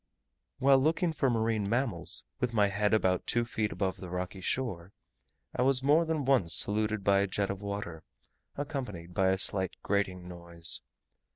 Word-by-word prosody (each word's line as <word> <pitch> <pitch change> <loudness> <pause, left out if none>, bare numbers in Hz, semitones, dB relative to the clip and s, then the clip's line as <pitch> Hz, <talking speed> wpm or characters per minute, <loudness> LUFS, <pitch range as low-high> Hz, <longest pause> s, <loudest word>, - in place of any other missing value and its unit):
While 135 0 +5
looking 160 +4 +1
for 135 -3 +1
marine 110 -3 0
animals, 115 - -1 0.2
with 120 -2 -2
my 105 -2 +3
head 105 +1 0
about 95 -4 +1
two 120 0 +1
feet 110 -2 -2
above 95 -2 -2
the 90 - -9
rocky 90 +2 -5
shore, 95 -6 -3 0.6
I - - -1
was 130 0 +2
more 150 +4 +4
than 160 -3 -2
once 115 - +4
saluted 105 +4 +2
by 100 0 +3
a 100 - +1
jet 100 +1 -1
of 100 0 -7
water, 100 -5 -5 0.6
accompanied 125 - -5
by 95 +1 +2
a 95 - +2
slight 95 -1 +1
grating 95 -3 -1
noise. 85 -1 0
100 Hz, 170 wpm, -30 LUFS, 95-125 Hz, 0.6 s, While